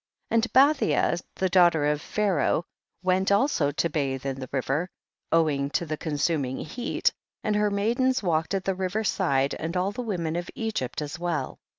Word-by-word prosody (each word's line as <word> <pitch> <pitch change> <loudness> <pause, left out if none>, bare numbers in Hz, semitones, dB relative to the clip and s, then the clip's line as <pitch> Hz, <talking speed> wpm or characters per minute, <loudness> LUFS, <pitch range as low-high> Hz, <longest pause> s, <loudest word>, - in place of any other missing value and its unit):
17. - - +1
And 230 +1 +2
Bathia, 275 - +4
the 190 - +1
daughter 175 -4 +4
of 150 0 +1
Pharaoh, 190 -5 0 0.4
went 185 +1 +2
also 200 - +3
to 145 +4 0
bathe 135 -4 -2
in 135 -1 -3
the 130 -2 -7
river, 140 +6 -1 0.4
owing 150 -4 +2
to 170 - -4
the 155 -1 -3
consuming 145 -3 -1
heat, 240 +10 -1 0.3
and 210 -1 0
her 210 0 +2
maidens 235 +5 +1
walked 165 +1 0
at 190 - -2
the 195 - +1
river 190 +3 -2
side, 140 -10 +1
and 165 +3 -3
all 185 +2 +1
the 225 - -5
women 175 -8 -2
of 175 0 -3
Egyptf 155 - -2
as 145 +2 -6
well. 175 -2 -2
175 Hz, 180 wpm, -26 LUFS, 150-205 Hz, 0.4 s, Bathia